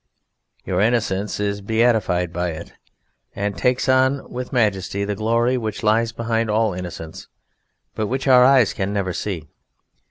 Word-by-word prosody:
Your 90 +1 0
innocence 105 -3 0
is 100 0 -2
beatified 110 -5 +1
by 90 +1 -1
it, 80 +2 -9 0.6
and 100 0 -2
takes 125 +10 0
on 130 +1 +2
with 125 0 -5
majesty 100 -4 0
the 105 - -2
glory 115 +4 +1
which 110 +1 -5
lies 115 +2 +2
behind 115 0 -1
all 110 -1 +1
innocence, 85 -3 -8 0.7
but 110 - -2
which 130 +4 -3
our 125 -1 +7
eyes 130 -4 +5
can 100 +1 -3
never 95 -3 -1
see. 85 -7 -4
110 Hz, 150 wpm, -21 LUFS, 95-120 Hz, 0.7 s, our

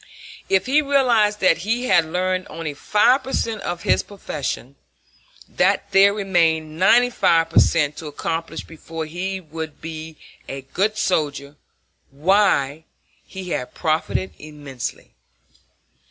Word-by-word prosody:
If 190 -1 +2
he 285 +4 +3
realized 240 -7 +2
that 185 -3 +4
he 230 +7 -1
had 170 -9 +4
learned 185 +3 -1
only 160 -2 -5
five 210 - +3
per 265 - -7
cent 225 -2 -1
of 175 0 -4
his - - +3
profession, 145 -8 -6 0.7
that - - +1
there 195 +1 +6
remained 165 -6 0
ninety 245 +6 +5
five 165 -7 +2
per - - +5
cent 150 -3 +2
to 160 - -7
accomplish 165 +2 -4
before 165 0 -7
he 185 +4 -4
would 160 -2 -8
be 160 -1 -8 0.3
a 135 0 -5
good 200 +11 -1
soldier, 145 -7 -1 0.5
why, 160 -2 +2 0.4
he 190 -2 -8
had 125 - -4
profited 160 +4 -1
immensely. 145 -4 -8
165 Hz, 130 wpm, -21 LUFS, 155-200 Hz, 0.7 s, there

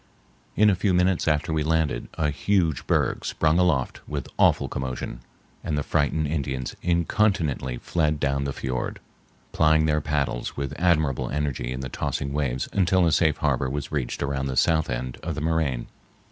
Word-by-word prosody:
In 105 0 +5
a - - +2
few 95 0 +1
minutes 90 -1 +2
after 80 +2 +1
we 80 - +1
landed 80 0 0
a 75 -3 0
huge 80 -4 0
berg - - +1
sprung 80 +2 +1
aloft 90 -8 +1
with 70 -3 -4
awful - - +4
commotion, 65 -2 -4 0.4
and 75 - -1
the 75 - 0
frightened 80 +1 +1
Indians 70 -4 -3
incontinently 85 - +1
fled 75 +1 0
down 70 -1 0
the 70 - -1
fiord, 65 -2 -3 0.5
plying 80 0 +4
their 75 -1 +2
paddles 70 -5 -2
with 70 0 -3
admirable 80 -6 +2
energy 70 -4 -2
in 65 +1 -4
the 65 - -4
tossing 70 +3 -3
waves 65 -4 -1
until 95 -2 +3
a 85 - +3
safe 80 -1 +3
harbor 65 - 0
was 70 +1 -4
reached 70 -5 -2
around 70 -1 -1
the 65 -1 -3
south 80 -1 +3
end 60 +1 -3
of 80 -1 -4
the 75 - -4
moraine. 80 -6 0
75 Hz, 175 wpm, -25 LUFS, 65-80 Hz, 0.5 s, In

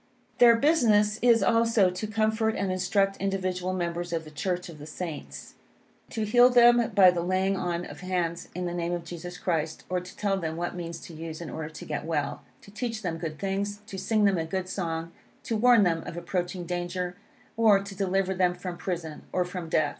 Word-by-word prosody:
Their 235 -1 +8
business 230 -7 +3
is, 235 -2 +5
also, 230 -5 +3
to 185 +4 -4
comfort 220 +1 +1
and 195 -2 -1
instruct 195 +2 +1
individual 185 -2 -1
members 175 -1 -3
of 165 -1 -1
the 155 - -12
Church 180 +4 -2
of 165 -3 -11
the 150 - -9
Saints; 160 -2 -7 0.6
to 220 -3 -2
heal 245 +3 +6
them 240 -1 +6
by 190 -3 +8
the 175 -1 -2
laying 185 +2 +1
on 175 -1 -2
of - - -10
hands 180 -2 -2
in 180 0 -3
the 175 - -3
name 175 0 -2
of 175 -1 -3
Jesus 175 +1 -7
Christ, 160 -3 -2
or 180 0 0
to 180 0 -12
tell 200 -2 0
them 160 -3 -3
what 175 +1 -2
means 170 -1 -6
to 170 - -10
use 160 0 -7
in 170 -3 -7
order 160 -1 -5
to 155 -2 -10
get 150 -1 -3
well; 145 -3 -2 0.2
to 200 - -14
teach 225 0 -4
them 165 -3 -3
good 160 -2 -5
things, 200 +2 -2
to 195 -3 -7
sing 215 +3 +1
them 195 -3 +3
a 160 - -1
good 185 +3 -3
song, 165 -3 -3 0.3
to 230 - -2
warn 235 0 +6
them 165 -3 +1
of 170 - -6
approaching 175 +1 -3
danger, 180 +1 -3 0.4
or, 220 -3 +5
to 200 0 -8
deliver 190 0 0
them 180 -1 +2
from 180 -1 -6
prison, 170 -4 -4
or 180 - +1
from 180 -2 -6
death. 155 -2 +2
180 Hz, 210 wpm, -27 LUFS, 170-205 Hz, 0.6 s, Their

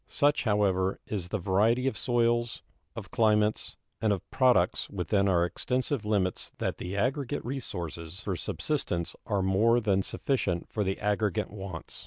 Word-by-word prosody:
Such, 145 -2 +2
however, 95 -3 +2
is 95 -5 -4
the 105 - -1
variety 105 +7 +2
of 135 - +1
soils, 120 -2 +1 0.3
of - - -8
climates, 105 -1 +2 0.3
and 110 - +3
of 100 - -2
products 125 -9 +3
within 100 +1 +1
our 85 -3 +3
extensive 125 +5 -1
limits 95 -4 0
that - - -2
the 95 +3 -4
aggregate 135 +5 -1
resources 90 - -5
for 100 -3 -2
subsistence 90 - -2
are 100 -4 +1
more 110 +6 +4
than 100 -4 +2
sufficient 95 -6 -1
for 105 - 0
the 95 0 -2
aggregate 105 -2 0
wants. 95 -5 -7
105 Hz, 150 wpm, -29 LUFS, 95-120 Hz, 0.3 s, more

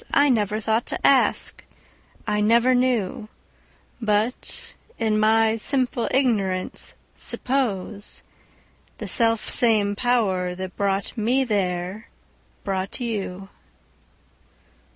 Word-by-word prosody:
I 285 +1 +5
never 215 -3 +1
thought 220 +2 0
to - - -3
ask, 275 -2 +2 0.6
I 210 -1 0
never 235 +4 +4
knew:But, 220 -1 -3 0.2
in 215 -2 +1
my 220 +1 +3
simple 250 0 0
ignorance, 200 -9 -1 0.2
supposeThe 215 -6 -2 0.9
self 230 -2 +2
same 210 -4 +4
Power 200 -7 0
that 185 0 -7
brought 200 0 -1
me 250 +5 +2
there 190 -2 -2 0.5
brought 195 +2 -3
you. 195 -5 -4
215 Hz, 90 wpm, -23 LUFS, 195-240 Hz, 0.9 s, I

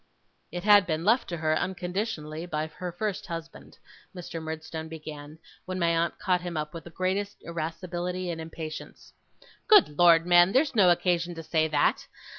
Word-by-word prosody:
'It 175 +1 -5
had 205 -2 +6
been 160 0 -2
left 230 +5 +3
to 170 - -3
her, 155 0 +1
unconditionally, 175 -3 -3
by 155 -2 -2
her 175 +3 -7
first 200 +3 -3
husband,' 165 -1 -8 0.4
Mr. 170 -2 -6
Murdstone 160 0 -6
began, 155 -1 -9 0.3
when 185 0 -4
my 170 -2 +2
aunt 165 +1 0
caught 180 -3 0
him 175 -2 -5
up 150 0 -4
with 165 -2 -8
the - - -9
greatest 190 +4 -2
irascibility 175 +2 -4
and 165 -1 -5
impatience. 160 -1 -8 0.5
'Good 405 - +5
Lord, 170 -1 +6
man, 175 +2 +5
there's 280 +2 +3
no 200 -6 +5
occasion 175 0 +1
to 165 - -7
say 160 0 +1
that. 150 -2 +1
170 Hz, 170 wpm, -27 LUFS, 160-185 Hz, 0.5 s, had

